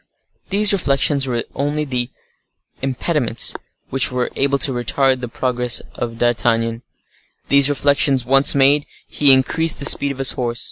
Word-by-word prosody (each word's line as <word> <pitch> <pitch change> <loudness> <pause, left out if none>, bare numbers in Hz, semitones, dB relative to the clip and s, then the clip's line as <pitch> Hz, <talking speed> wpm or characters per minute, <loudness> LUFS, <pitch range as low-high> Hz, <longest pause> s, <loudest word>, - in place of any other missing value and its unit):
These 205 +1 +3
reflections 140 -5 0
were 120 -2 -2
the - - -26
only 140 -4 -3 0.7
impediments 135 -2 -1 0.4
which 135 -1 +3
were 125 -1 -3
able 140 0 0
to 140 - +2
retard 130 +2 0
the 125 - -5
progress 125 0 -2
of 115 -1 -6
D'Artagnan. 115 -1 -1 0.7
These 140 0 +5
reflections 140 -2 +1
once 135 +3 +3
made, 140 +1 +2 0.2
he 145 -2 +2
increased 145 +5 +2
the 140 - -5
speed 140 0 +3
of 135 - -8
his 135 0 +3
horse. 120 -1 -4
135 Hz, 145 wpm, -18 LUFS, 120-140 Hz, 0.7 s, These